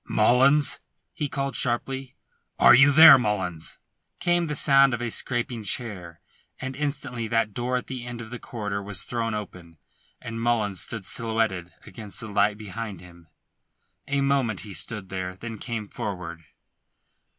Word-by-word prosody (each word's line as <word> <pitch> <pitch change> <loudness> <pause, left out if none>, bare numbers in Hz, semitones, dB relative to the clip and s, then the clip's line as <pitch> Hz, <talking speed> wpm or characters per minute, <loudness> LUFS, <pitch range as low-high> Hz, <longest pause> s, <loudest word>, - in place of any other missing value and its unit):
"Mullins!" 130 +6 +4 0.3
he 150 - -2
called 135 -1 -3
sharply. 130 +1 -1 0.4
"Are - - +8
you 145 +3 +7
there? 155 -2 +10
Mullins?" 95 -8 -2 0.4
Came 175 -1 +1
the 150 - -3
sound 135 -2 +5
of - - -7
a 120 -1 -3
scraping 120 -1 -1
chair, 95 -6 -4 0.4
and 130 0 -5
instantly 135 -5 -3
that 115 -2 0
door 125 +2 -1
at 125 - -5
the 125 -2 -6
end 120 -1 -6
of 110 -1 -9
the 125 - -6
corridor 105 -4 -4
was 100 0 -5
thrown 115 -2 -2
open, 90 -5 -8 0.4
and 115 0 -6
Mullins 110 -5 0
stood 110 -5 -5
silhouetted 110 -5 -2
against 105 -2 -7
the 110 - -6
light 105 +1 +2
behind 105 -2 -6
him. 85 -1 -16 0.8
A 140 0 0
moment 135 -7 +1
he 105 -2 -9
stood 105 -2 -5
there, 95 -1 -4
then 115 +2 -8
came 115 -4 -4
forward. 85 -6 -6
115 Hz, 155 wpm, -25 LUFS, 100-125 Hz, 0.8 s, there